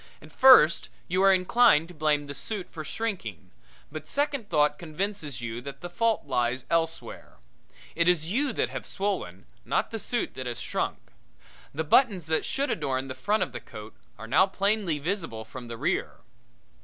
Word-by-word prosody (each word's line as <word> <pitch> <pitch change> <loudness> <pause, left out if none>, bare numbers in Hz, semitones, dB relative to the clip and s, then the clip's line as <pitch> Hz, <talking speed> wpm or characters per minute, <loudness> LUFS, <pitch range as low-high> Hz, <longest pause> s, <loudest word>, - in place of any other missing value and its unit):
At - - -15
first 210 -12 +6 0.2
you 185 +2 +1
are 195 0 +6
inclined 185 -3 +4
to - - -11
blame 150 -2 +1
the 140 - -6
suit 185 +7 -5
for 155 - -6
shrinking, 175 - -5 0.4
but 155 +1 -8
second 280 -6 -1
thought 150 0 +2
convinces 160 -5 -4
you 115 0 -5
that 140 +1 -9
the 175 - -7
fault 230 0 +1
lies 125 -1 -1
elsewhere. 165 -7 -2 0.6
It 170 0 +1
is 175 -3 +3
you 260 - 0
that - - 0
have - - -6
swollen, 190 - -3 0.2
not - - -1
the 225 - -4
suit 240 +2 -2
that 130 -1 -6
has 120 -1 -4
shrunk. - - -2 0.7
The 155 +3 -2
buttons 190 - +3
that 160 0 0
should 280 +1 -1
adorn 135 -3 -2
the - - -3
front 205 +12 0
of - - -5
the - - -6
coat 105 0 -11 0.2
are 110 - -8
now 155 +12 +4
plainly 195 -4 0
visible 160 - -3
from 120 +2 -9
the 115 0 -7
rear. - - -1
160 Hz, 180 wpm, -27 LUFS, 130-200 Hz, 0.7 s, first